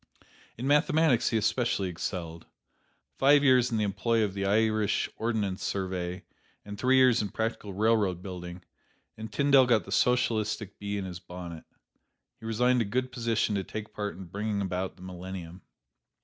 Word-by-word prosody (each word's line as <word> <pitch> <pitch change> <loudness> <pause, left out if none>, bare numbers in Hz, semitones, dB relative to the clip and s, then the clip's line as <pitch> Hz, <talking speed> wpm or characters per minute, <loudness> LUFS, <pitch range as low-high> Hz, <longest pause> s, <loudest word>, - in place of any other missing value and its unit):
In 120 - -5
mathematics 150 -2 +3
he 115 - +1
especially 110 -2 0
excelled. 85 -2 -5 0.7
Five 145 +1 +5
years 130 -3 +5
in 115 - -1
the 105 - +1
employ 115 +3 +1
of 100 -3 -1
the 100 0 -2
Irish 110 0 +2
Ordnance 105 -5 -2
Survey 90 -2 -3 0.4
and 105 0 -7
three 130 +5 +2
years 130 -3 +5
in 105 - -3
practical 110 -2 -3
railroad 105 -3 +1
building, 90 -2 -7 0.5
and 110 0 -8
Tyndall 140 0 +5
got 115 -4 +3
the - - -11
Socialistic 110 -4 0
bee 100 0 -3
in 100 - -3
his 90 -2 -7
bonnet. 85 -2 -9 0.7
He 110 - -8
resigned 125 +2 +2
a - - +3
good 125 +5 -2
position 115 -3 0
to 100 -1 -1
take 110 +2 -7
part 105 -5 -4
in 95 - -8
bringing 100 +4 -3
about 95 -1 -3
the 90 - -14
millennium. 90 -1 -8
105 Hz, 165 wpm, -28 LUFS, 95-115 Hz, 0.7 s, Five